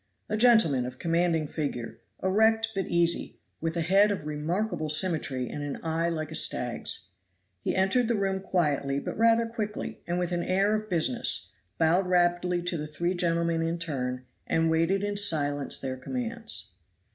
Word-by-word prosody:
A 215 - 0
gentleman 215 - +4
of 125 0 -8
commanding 165 0 +1
figure, 125 -7 -4 0.2
erect 220 +4 +3
but 195 -3 -2
easy, 170 0 +1 0.2
with 165 +1 -2
a - - +1
head 195 +5 +5
of 195 -7 -3
remarkable 155 +3 -2
symmetry 150 -5 +1
and 145 - -6
an 145 -1 -4
eye 165 +1 0
like 155 -2 -3
a - - -5
stag's. 125 -6 -1 0.5
He - - -1
entered 195 +6 +3
the 235 - +1
room 195 -2 0
quietly 145 -7 0
but - - -5
rather 230 +1 +4
quickly, 215 -2 -5
and 175 +1 -1
with 180 0 -1
an 175 -1 0
air 195 +4 +2
of 215 0 -2
business; 160 -8 0 0.3
bowed 175 +4 +3
rapidly 175 0 +2
to 175 -1 -2
the 150 0 -4
three 170 +4 -1
gentlemen 170 -2 +1
in 165 +1 -1
turn, 130 -6 -3 0.2
and 165 0 +2
waited 165 +5 +2
in 205 0 -2
silence 145 -7 +2
their 130 -1 -4
commands. 230 - -4
170 Hz, 170 wpm, -28 LUFS, 155-195 Hz, 0.5 s, head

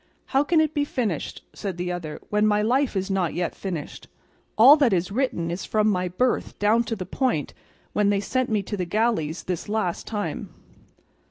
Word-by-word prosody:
"How 270 +1 +2
can 320 +2 +3
it 310 -1 +2
be 290 - +1
finished," 230 - -3
said 195 -4 -5
the 180 0 -2
other, 165 -4 -5
"when 210 +1 +3
my 210 0 +2
life 255 +2 +1
is 190 +1 -1
not 185 -3 0
yet 175 0 -1
finished? 175 -6 -6 0.5
All 255 +7 +9
that 270 -8 +3
is 180 +1 0
written 200 -8 -1
is 175 +2 -4
from 215 -1 +1
my 185 -3 +1
birth 240 +8 -1
down 220 +3 +3
to 225 - -2
the 185 -3 -5
point 245 - -1 0.4
when 205 -1 +2
they 200 -1 +2
sent 255 +5 -1
me 215 -3 +1
to 205 - -4
the 185 -3 -2
galleys 180 -5 0
this 180 +1 -4
last 210 -5 -1
time." 210 -2 -3
205 Hz, 195 wpm, -24 LUFS, 180-235 Hz, 0.5 s, All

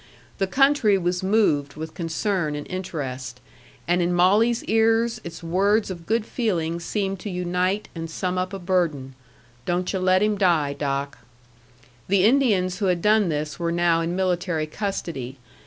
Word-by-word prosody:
The 195 - +1
country 270 -3 +3
was 180 0 -1
moved 190 -9 +1
with 160 0 -7
concern 170 -1 -1
and 145 - -5
interest; 130 -9 -5 0.5
and 175 +1 +2
in 175 +1 +1
Molly's 210 +7 +3
ears 225 +1 +2
its 170 0 -9
words 195 +5 +1
of 170 -2 -9
good 225 0 +1
feeling 170 -10 -1
seemed 195 +2 -2
to 205 - -6
unite 180 +2 -1
and 165 -1 -6
sum 180 +2 -2
up 185 +1 -2
a 195 - -4
burden, 170 -8 -1 0.5
"Don't 180 +2 -1
yu' 190 - -1
let 185 +1 +3
him 210 -1 +1
die, 165 -7 +2
Doc." 140 -1 -3 0.9
The 190 -1 +3
Indians 210 -7 +3
who 205 - 0
had 180 -2 0
done 210 -3 +4
this 150 -1 -3
were 170 -1 -1
now 170 -1 +2
in 170 +1 -2
military 180 -3 0
custody. 155 - -4
180 Hz, 160 wpm, -24 LUFS, 165-200 Hz, 0.9 s, done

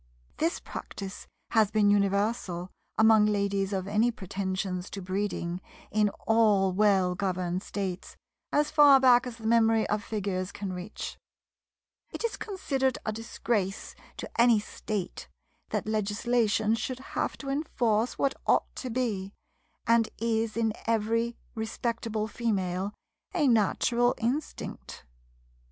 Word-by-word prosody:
This 330 +3 0
practice 195 0 -7 0.2
has 220 -3 +4
been 210 -1 +3
universal 200 -3 0 0.3
among 220 -1 +6
ladies 200 -1 0
of 190 -1 -2
any 215 +4 +3
pretensions 190 -3 -3
to 200 - -6
breeding 185 -2 -2 0.3
in 210 0 +3 0.2
all 210 -4 +4
well 190 -2 +3
governed 185 -1 -1
States, 190 -3 -5 0.3
as 295 0 +2
far 290 -3 +8
back 250 -1 +5
as 235 -2 -7
the 225 - -11
memory 225 -1 +4
of 210 0 0
Figures 195 -3 -2
can 195 -2 -5
reach. 180 +3 -6 0.9
It - - -6
is 465 - -1
considered 270 - -1
a 215 - 0
disgrace 215 -2 -2 0.2
to - - -2
any 235 -2 +6
state 210 -2 -5 0.4
that - - -2
legislation 215 +1 +1
should 230 +3 -2 0.2
have - - -1
to 275 - -6
enforce 240 -6 0
what 275 -1 +1
ought - - +2
to 255 - -4
be, 215 -5 -2 0.5
and 230 -1 +4
is 225 -1 0
in 225 -2 +1
every 230 +1 +1 0.2
respectable 225 -1 -2
female, 195 -4 -1 0.4
a 305 -5 +3
natural 240 +2 +3
instinct. 255 +7 -4
215 Hz, 125 wpm, -28 LUFS, 195-235 Hz, 0.9 s, far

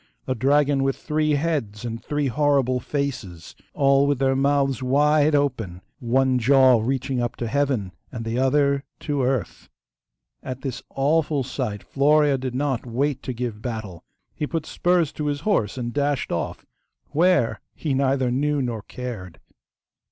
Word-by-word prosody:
a 130 - 0
dragon 140 +3 +2
with 135 0 +1
three 155 -1 0
heads 140 -9 -1
and 115 0 -5
three 145 -1 -1
horrible 135 -1 +2
faces, 120 - -4 0.2
all 140 0 +4
with 145 -1 +2
their 135 0 +2
mouths 135 -1 +1
wide 150 +3 +3
open, 115 -11 -1 0.2
one 130 +1 +2
jaw 130 -1 +5
reaching 130 +1 -1
to 120 - -3
heaven 130 -7 0 0.2
and 115 -3 -6
the 115 +1 -2
other 140 +1 +2 0.2
to 145 -2 -2
earth. 130 -2 -2 0.7
At 130 0 -6
this 130 -3 -4
awful 145 0 +1
sight 120 -5 -4
Florea 145 0 +3
did 130 -1 -4
not 135 -2 -1
wait 130 +3 -1
to - - -4
give 120 -3 -4
battle. 110 -8 -6 0.3
He 150 - -3
put 165 -1 -3
spurs 175 -3 +1
to 150 - -4
his 145 0 -2
horse 165 - 0
and 120 -1 -3
dashed 145 -1 0
off, 85 - -3 0.5
WHERE 150 - +2 0.2
he 150 -4 -2
neither 135 -1 +1
knew 145 +3 +1
nor 120 -5 -2
cared. 105 -7 -7
135 Hz, 150 wpm, -23 LUFS, 120-145 Hz, 0.7 s, jaw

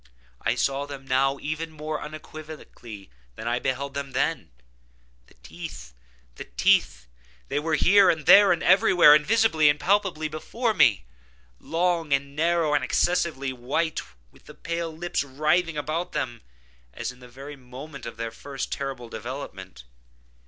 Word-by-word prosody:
I - - 0
saw 140 +1 -1
them 140 -2 -9
now 135 +1 +1
even 155 +2 -4
more 155 0 -5
unequivocally 150 - -10 0.2
than 110 - -7
I 120 +1 0
beheld 135 +2 -3
them 140 -1 -5
then. 165 +2 -1 0.8
The - - -23
teeth!—the - - -11
teeth!—they - - 0
were 160 +1 0
here, 200 +2 +5
and 160 -2 0
there, 200 0 +8
and 170 - 0
everywhere, 180 -4 +6
and 150 0 +5
visibly 210 -7 +3
and 145 0 +1
palpably 190 -5 +1
before 220 +10 -2
me; 105 - +3 0.5
long, 170 -1 -1 0.2
narrow, 165 0 +1
and 145 -2 +2
excessively 140 -2 0
white, 150 +7 -2 0.3
with - - -23
the - - -13
pale 170 0 -4
lips 170 +1 -2
writhing 155 +4 0
about 155 +4 -3
them, 125 -6 -3 0.5
as - - -4
in 125 - -18
the 125 - -13
very 135 +4 -10
moment 135 +2 -10
of 115 - -8
their 115 0 -4
first 135 +3 -6
terrible 135 -3 -4
development. 110 - -8
145 Hz, 145 wpm, -25 LUFS, 125-165 Hz, 0.8 s, there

